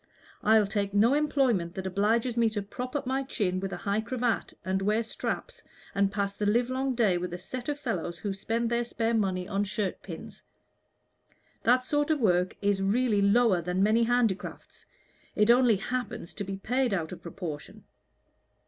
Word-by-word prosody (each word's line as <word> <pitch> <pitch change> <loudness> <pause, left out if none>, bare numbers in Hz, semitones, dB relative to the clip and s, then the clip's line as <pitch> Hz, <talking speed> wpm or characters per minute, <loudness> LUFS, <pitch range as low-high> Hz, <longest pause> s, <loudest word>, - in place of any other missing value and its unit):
I'll 220 -1 +5
take 200 0 -2
no 225 +6 +5
employment 265 - +1
that 190 - -5
obliges 220 +6 +1
me 230 -1 +3
to 205 - -1
prop 250 +6 -6
up 285 - -1
my 265 +2 0
chin 200 -9 -1
with 195 0 -4
a - - -4
high 200 +2 -1
cravat, 240 0 -1
and 190 +1 0
wear 210 +3 +1
straps, - - -4 0.3
and 200 0 +2
pass 200 -1 -1
the 205 +1 -2
livelong 255 +4 +1
day 205 -7 +3
with 175 0 -4
a - - -5
set 245 +9 -6
of 290 0 -2
fellows 175 - -3
who 200 +4 -3
spend 230 +4 -2
their 235 0 +2
spare 230 -1 -1
money 190 -4 0
on 200 -1 0
shirt 200 -1 -3
pins. - - -9 1.2
That 250 +2 +4
sort 290 +3 0
of 310 -2 +2
work 180 -5 +2
is 200 -1 +2
really 210 +1 +2
lower 200 -2 +4
than 180 +3 0
many 220 +3 +4
handicrafts; 230 -4 -1 0.5
it 210 +2 +5
only 245 -2 +5
happens 245 -3 -4
to 205 - -4
be 195 0 -5
paid 245 +2 0
out 160 -3 -3
of 180 - -8
proportion. 165 -3 -7
215 Hz, 180 wpm, -28 LUFS, 195-245 Hz, 1.2 s, I'll